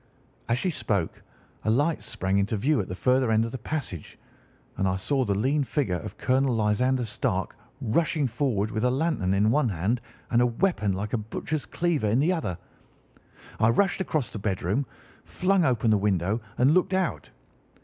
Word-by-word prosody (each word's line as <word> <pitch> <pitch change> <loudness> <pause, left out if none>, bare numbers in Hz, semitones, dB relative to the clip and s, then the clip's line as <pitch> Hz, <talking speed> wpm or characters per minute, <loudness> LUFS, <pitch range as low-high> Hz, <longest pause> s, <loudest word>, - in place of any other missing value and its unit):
"As 115 - +2
she 185 +7 0
spoke 100 - -2 0.4
a - - 0
light 145 +8 +2
sprang 95 +1 -1
into 100 +2 0
view 135 +4 +2
at 95 - -6
the 90 - -5
further 130 +4 +2
end 110 0 +3
of 115 - -5
the 130 - -5
passage, 115 - -5 0.6
and 95 - +1
I 95 - +1
saw 130 +8 0
the 100 -4 0
lean 140 +7 +1
figure 120 - -1
of 105 -3 -8
Colonel 130 0 +2
Lysander 120 +4 +1
Stark 110 - -2 0.3
rushing 155 +6 +1
forward 115 -4 0
with 110 - -2
a 125 - +4
lantern 130 - 0
in 105 +3 +3
one 145 -2 +2
hand 100 +6 -1 0.3
and 120 - +4
a 125 - +4
weapon 120 - 0
like 100 +3 -4
a 120 - +1
butcher's 140 +7 -4
cleaver 165 -9 0
in 115 +5 +2
the 165 +6 +3
other. 125 - -3 1.0
I 110 - +4
rushed 195 +10 +2
across 155 -8 -1
the 105 - -6
bedroom, 100 +6 -1 0.4
flung 190 0 +1
open 120 -5 +2
the 105 - +4
window, 100 +2 0 0.2
and 130 +4 +4
looked 185 +1 +2
out. 190 -2 -1
120 Hz, 185 wpm, -26 LUFS, 105-145 Hz, 1.0 s, a